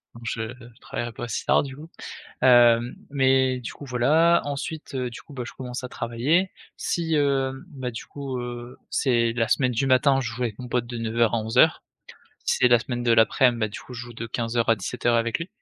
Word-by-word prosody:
donc 115 Hz, -, -12 dB
je 110 Hz, +1 st, -3 dB, 0.3 s
travaillerai 120 Hz, 0 st, -5 dB
pas -, -, -7 dB
aussi 115 Hz, -, -4 dB
tard -, -, +4 dB
du 135 Hz, -2 st, -7 dB
coup. 155 Hz, +4 st, -11 dB, 0.5 s
Hem, 120 Hz, -1 st, +5 dB, 0.2 s
mais 130 Hz, -2 st, +2 dB
du 115 Hz, -, -6 dB
coup, 145 Hz, -, -11 dB
voilà, 155 Hz, +7 st, +3 dB
ensuite, 145 Hz, +1 st, -5 dB
heu, 125 Hz, -2 st, -2 dB
du 120 Hz, -, -9 dB
coup, -, -, -16 dB
bah, 130 Hz, -3 st, -5 dB
je -, -, -8 dB
commence 125 Hz, 0 st, -6 dB
à -, -, -4 dB
travailler 130 Hz, +12 st, 0 dB, 0.3 s
si, 165 Hz, -2 st, -1 dB
hem, 135 Hz, -1 st, 0 dB
bah, 130 Hz, -5 st, -5 dB
du 115 Hz, -, -8 dB
coup, 135 Hz, -3 st, -5 dB
heu, 120 Hz, 0 st, -7 dB
c'est 120 Hz, -4 st, +2 dB
la 115 Hz, -2 st, 0 dB
semaine 130 Hz, -2 st, +2 dB
du 135 Hz, +4 st, 0 dB
matin, 135 Hz, +1 st, +4 dB
je 120 Hz, -, -3 dB
joue 125 Hz, +2 st, -5 dB
avec 110 Hz, -4 st, -3 dB
mon 125 Hz, -1 st, -7 dB
pote 120 Hz, 0 st, -1 dB
de 120 Hz, -1 st, -6 dB
9:00 115 Hz, 0 st, +1 dB
à -, -, +2 dB
11:00, 115 Hz, +8 st, +3 dB, 0.6 s
si -, -, +1 dB
c'est 125 Hz, -, +6 dB
la 120 Hz, -1 st, +5 dB
semaine 120 Hz, -1 st, -4 dB
de 120 Hz, -, +3 dB
l'aprem, 120 Hz, +2 st, +4 dB
bah, 110 Hz, -, +1 dB
du 105 Hz, -, -8 dB
coup, 125 Hz, -, -12 dB
je 120 Hz, -, -6 dB
joue 120 Hz, 0 st, -10 dB
de 115 Hz, +1 st, -6 dB
15:00 115 Hz, 0 st, -1 dB
à 115 Hz, -, +5 dB
17:00 120 Hz, +4 st, -1 dB
avec 115 Hz, +2 st, 0 dB
lui. 165 Hz, -, -5 dB
125 Hz, 225 wpm, -24 LUFS, 115-135 Hz, 0.6 s, c'est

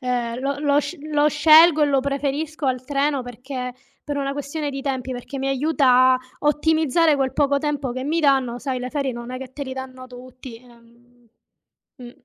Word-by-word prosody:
Ehm, 245 Hz, -2 st, -2 dB
lo 280 Hz, +1 st, -2 dB
lo 290 Hz, 0 st, +2 dB
sc 355 Hz, -, -6 dB
lo 295 Hz, 0 st, +3 dB
scelgo 310 Hz, +1 st, +6 dB
e -, -, +4 dB
lo 275 Hz, -2 st, +2 dB
preferisco 285 Hz, +2 st, -3 dB
al 255 Hz, -1 st, -1 dB
treno 280 Hz, 0 st, 0 dB
perché 250 Hz, +1 st, -6 dB, 0.3 s
per 290 Hz, -, -4 dB
una 275 Hz, -1 st, -2 dB
questione 290 Hz, +1 st, -4 dB
di 275 Hz, 0 st, -5 dB
tempi, 260 Hz, -2 st, -3 dB
perché 250 Hz, +3 st, -7 dB
mi 270 Hz, 0 st, -2 dB
aiuta 265 Hz, -2 st, +3 dB
a -, -, -1 dB, 0.2 s
ottimizzare 315 Hz, +1 st, +2 dB
quel 270 Hz, -1 st, -1 dB
poco 280 Hz, -1 st, +2 dB
tempo 290 Hz, -3 st, -2 dB
che 255 Hz, +1 st, -5 dB
mi 320 Hz, +4 st, 0 dB
danno, 265 Hz, -5 st, +2 dB
sai 260 Hz, -1 st, -3 dB
le 250 Hz, 0 st, -5 dB
ferie 275 Hz, -1 st, -2 dB
non 235 Hz, 0 st, -8 dB
è 255 Hz, -, -5 dB
che 260 Hz, -1 st, -9 dB
te 280 Hz, +1 st, -6 dB
li 260 Hz, -, -6 dB
danno 260 Hz, -1 st, -8 dB
tutti, 255 Hz, -1 st, -11 dB
ehm 240 Hz, 0 st, -22 dB, 0.7 s
mh. 245 Hz, -3 st, -10 dB
270 Hz, 195 wpm, -22 LUFS, 255-290 Hz, 0.7 s, scelgo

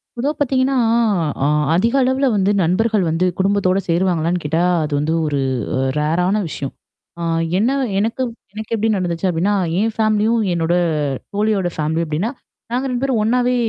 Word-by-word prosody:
பொதுவா 265 Hz, +5 st, -1 dB
பார்த்தீங்கன்னா, 265 Hz, -1 st, +1 dB, 0.7 s
அ -, -, +3 dB, 0.3 s
அதிக 230 Hz, +7 st, +2 dB
அளவுல 260 Hz, +2 st, +2 dB
வந்து 200 Hz, 0 st, +2 dB
நண்பர்கள் 210 Hz, +4 st, +1 dB
வந்து 165 Hz, +3 st, +1 dB
குடும்பத்தோட 195 Hz, -1 st, +2 dB
சேருவாங்களான்னு 170 Hz, 0 st, +1 dB
கேட்டா, 160 Hz, +3 st, 0 dB, 0.2 s
அது 150 Hz, -1 st, -3 dB
வந்து 155 Hz, +3 st, 0 dB
ஒரு 145 Hz, -2 st, -1 dB, 0.4 s
அ -, -, 0 dB, 0.2 s
ரேரான 175 Hz, +6 st, +1 dB
விஷயம். 140 Hz, -2 st, -5 dB, 0.5 s
ஆ -, -, -5 dB, 0.4 s
என்ன 220 Hz, +6 st, +2 dB, 0.3 s
எனக்கு 225 Hz, +5 st, -1 dB, 0.3 s
எனக்கு 220 Hz, +1 st, -6 dB
எப்படி 220 Hz, 0 st, 0 dB
நடந்துச்சு 175 Hz, 0 st, -1 dB
அப்டின்னா, 180 Hz, +4 st, +1 dB, 0.3 s
என் 220 Hz, +2 st, 0 dB
ஃபேமிலியும், 220 Hz, +1 st, +2 dB
என்னோட 170 Hz, 0 st, 0 dB, 0.6 s
தோழியோட 205 Hz, -3 st, +1 dB
ஃபேமிலி 160 Hz, +2 st, -1 dB
அப்டின்னா. 160 Hz, +9 st, -1 dB, 0.4 s
நாங்க 250 Hz, +2 st, 0 dB
2 250 Hz, +1 st, -2 dB
பேரும் 260 Hz, -5 st, +1 dB
ஒண்ணாவே 245 Hz, +3 st, +2 dB
200 Hz, 150 wpm, -19 LUFS, 170-230 Hz, 0.7 s, அ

